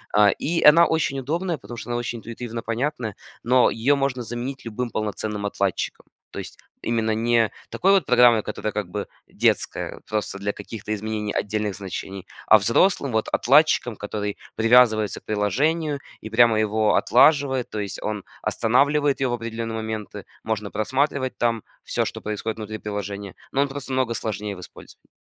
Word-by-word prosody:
А, 105 -1 +7
и 165 - -1
она 165 +3 +8
очень 160 -5 0
удобная, 165 +6 -2
потому 120 -2 -10
что 115 - -8
она 120 - -1
очень 120 -1 -3
интуитивно 115 0 -6
понятная, 115 -2 -2 0.3
но 125 +1 +4
ее 125 +6 +2
можно 135 -2 -1
заменить 120 +3 -5
любым 120 +2 -3
полноценным 105 -1 -3
отладчиком, 100 -2 -2 0.3
то - - -6
есть - - -8 0.3
именно 110 -1 0
не 115 0 +2 0.2
такой 195 - +2
вот 195 -6 +4
программой, 120 -2 +6
которая 105 0 -4
как 105 -4 -3
бы 100 +2 -4 0.2
детская, - - 0
вот - - -17
просто 105 -2 -3
для 100 +1 -1
каких-то 105 +1 -6
изменений 105 0 -3
отдельных 105 -1 -1
значений, 95 0 -6 0.2
а 110 - +9
взрослым 125 - +2
вот 110 0 0
отладчиком, 135 -3 +4
который 105 0 -4 0.2
привязывается 110 -3 +4
к - - -48
приложению 140 - 0 0.2
и 110 - -7
прямо 115 -1 +5
его 110 0 +2
отлаживает, 140 -4 +4
то 110 - -4
есть 100 -3 -5
он 105 -2 -3 0.2
останавливает 140 +4 +2
его 130 -2 +1
в - - +2
определенные 115 -1 -4
моменты, 110 -2 -5 0.2
можно 105 -2 -3
просматривать 130 +4 -1
там 115 -2 0 0.2
всё, - - -1
что - - -5
происходит 105 +1 -3
внутри 110 0 -6
приложения, 100 -1 -5 0.2
но 140 - +2
он 140 - +2
просто 135 0 -7
намного 130 -3 0
сложнее 105 -2 -3
в - - -11
использовании. - - -14
115 Hz, 170 wpm, -23 LUFS, 105-130 Hz, 0.3 s, а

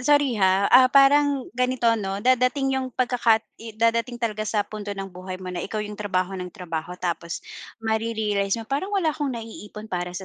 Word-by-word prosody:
sorry 290 0 +3
ha? 190 0 +3
Ah, 255 +1 +8
parang 275 0 +5
ganito 250 0 -1
ano, 200 -3 -1
darating 255 +2 +3
yung 260 - -2
pagkaka 240 -3 +2 0.3
darating 230 +2 +1
talaga 215 -3 -2
sa 210 -2 +1
punto 205 -1 -6
ng 195 0 -5
buhay 185 +1 -7
mo 185 0 -7
na 175 - -3
ikaw 215 +4 -3
yung 210 0 -7
trabaho 190 -2 -1
ng 180 0 -5
trabaho 175 -3 -5
tapos 170 -2 -3 0.4
mare-realize 220 -2 0
mo, 225 - -6
"Parang 275 - -2
wala 330 -6 +2
akong 290 -2 -2
naiipon 220 -1 -9
para 175 0 -2
sa 190 - -6
220 Hz, 180 wpm, -24 LUFS, 195-255 Hz, 0.4 s, Ah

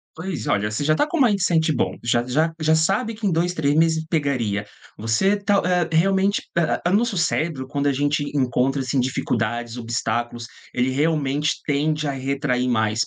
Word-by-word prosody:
Pois. 160 - -5
Olha, 105 +1 +1
você 105 - -3
já 155 +1 +3
tá 295 - +2
com 340 - -3
um - - +5
mindset 180 -8 +2
bom. 135 - -1
Já 120 +1 +1
já 155 +6 +1
já 155 0 +3
sabe 195 +8 +1
que 220 +1 -10
em - - +3
2, 175 +2 0
3 145 -4 +1
meses 160 0 +2
pegaria, 120 -10 -1 0.3
você 115 - +2
tá 200 -1 +1
eh, 180 -2 +1
realmente 195 +3 +2
a 170 -2 +1
a - - 0
o - - +2
nosso 225 0 +1
cérebro, 160 -5 -1
quando 140 +1 -2
a 140 - +3
gente 145 +2 0
encontra, 135 +1 +1
assim, 130 +1 -1
dificuldades, 120 -2 -1
obstáculos, 120 0 -3 0.3
ele 125 +1 +1
realmente 145 0 0
tende 150 +1 0
a - - +1
retrair 135 -1 -1
mais, 110 -2 +1
145 Hz, 190 wpm, -22 LUFS, 125-170 Hz, 0.3 s, um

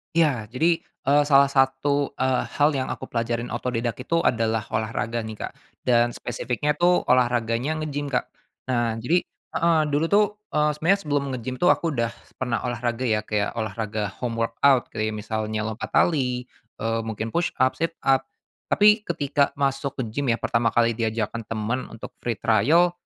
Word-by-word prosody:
Iya. 140 -10 +2
Jadi, 160 +9 +1 0.3
eee, 145 +1 +5
salah 140 -1 +6
satu, 140 +1 +1
eee, 130 -1 +1
hal 145 +1 +4
yang 130 -2 -2
aku 130 - -5
pelajarin 120 0 -2
otodidak 120 -2 -2
itu 165 +6 0
adalah 115 -2 +1
olahraga 110 +1 -2
nih, 110 -1 -6
Kak. - - -6 0.3
Dan 120 -1 +3
spesifiknya 125 +4 -2
tuh 175 +2 +3
olahraganya 125 +4 +1
ngegim 145 -1 -3
Kak. 130 -3 0 0.5
Nah, 120 -2 +1
jadi 160 +10 +2 0.4
heeh, 170 -1 +3
dulu 145 +2 +1
tuh, 210 +1 +6 0.3
eee, 150 0 +3
sebenernya 185 +6 +2
sebelum 145 -3 0
ngegim 125 +1 -4
tuh 180 - +5
aku 165 - 0
udah 115 0 0 0.3
pernah 125 -3 -1
olahraga 120 0 -2
ya 110 -2 +2
kayak 105 0 -1
olahraga 110 -1 -3
home 120 -2 -2
workout, 130 +3 +3
kayak 110 0 -2
misalnya 110 0 -3
lompat 110 +1 -4
tali, 125 -7 +2 0.4
eee, 115 +1 0
mungkin 110 0 -4
push 170 0 0
up, 130 0 +3
sit 165 +1 -1
up 135 -1 +3 0.4
tapi 210 +2 +5
ketika 145 -3 0
masuk 140 0 -1
ke 130 - -2
gim 140 +4 -2
ya 115 - +3
pertama 115 0 0
kali 115 0 +4
diajarkan 115 0 -2
temen 115 +3 -2
untuk 115 - -9
free 120 -1 -2
trial, 135 - +3
125 Hz, 165 wpm, -24 LUFS, 115-145 Hz, 0.5 s, salah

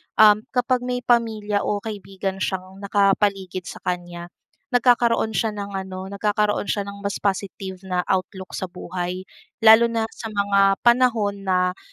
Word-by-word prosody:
um, 210 -1 +7 0.2
kapag 250 +1 +2
may 250 0 -3
pamilya 220 -4 +1
o 205 -1 -1
kaibigan 195 -2 -5
siyang 190 0 -4
nakapaligid 195 -2 +1
sa - - -9
kanya, 175 -1 -4 0.4
nagkakaroon 240 -2 +3
siya 220 -2 0
ng 200 -1 -5
ano 190 0 -6
nagkakaroon 205 +1 0
siya 205 - -1
ng 200 0 -7
mas 200 - -3
positive 195 -1 -3
na 180 -1 0
outlook 190 0 -2
sa - - -2
buhay. 180 0 -5 0.4
Lalo 225 +1 +8
na 225 -1 -1
sa 225 -2 -8
mga 200 -1 +2
panahon 230 -5 +2
na 180 -1 +1
200 Hz, 145 wpm, -23 LUFS, 190-220 Hz, 0.4 s, Lalo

